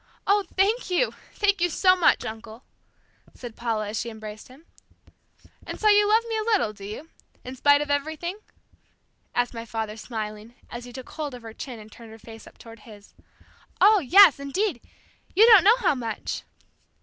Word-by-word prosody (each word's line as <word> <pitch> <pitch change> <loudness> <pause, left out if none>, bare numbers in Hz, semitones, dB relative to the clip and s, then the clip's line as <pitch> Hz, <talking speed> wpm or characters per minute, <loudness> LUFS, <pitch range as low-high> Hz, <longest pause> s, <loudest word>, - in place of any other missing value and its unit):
"Oh, 405 0 +2
thank 410 +4 +1
you, 365 +7 0 0.2
thank 405 -3 +1
you 350 - +2
so 370 +3 +3
much, 360 - +2
uncle," 220 +2 -9 0.7
said 240 -3 -10
Paula 220 -3 -3
as 215 - -3
she 235 - -4
embraced 215 -1 -10
him. 270 +6 -18 1.0
"And - - -8
so 430 - +3
you 415 0 +4
love 445 +2 +4
me 450 -1 -2
a - - -1
little, 430 - 0
do 200 -1 -12
you? 220 +11 -8 0.3
In 255 +1 -8
spite 285 +2 +4
of 295 -1 -3
everything?" 315 +6 -3 1.0
asked 245 0 0
my 230 -1 -6
father 220 -2 -5
smiling, 215 0 -7 0.2
as 240 0 -7
he 245 - -11
took 255 0 -10
hold 295 -5 -5
of 245 - -13
her 225 -1 -10
chin 250 +1 -8
and 215 0 -14
turned 230 0 -14
her 220 - -12
face 225 0 -13
up - - -17
toward 230 -1 -14
his. 210 -2 -16 0.7
"Oh, 425 0 +6
yes, 350 0 +6
indeed; 280 - -2 0.5
you 425 +4 +7
don't 435 -6 +8
know 435 +5 +5
how 415 -10 +1
much!" 230 -5 -5
260 Hz, 185 wpm, -24 LUFS, -, 1.0 s, don't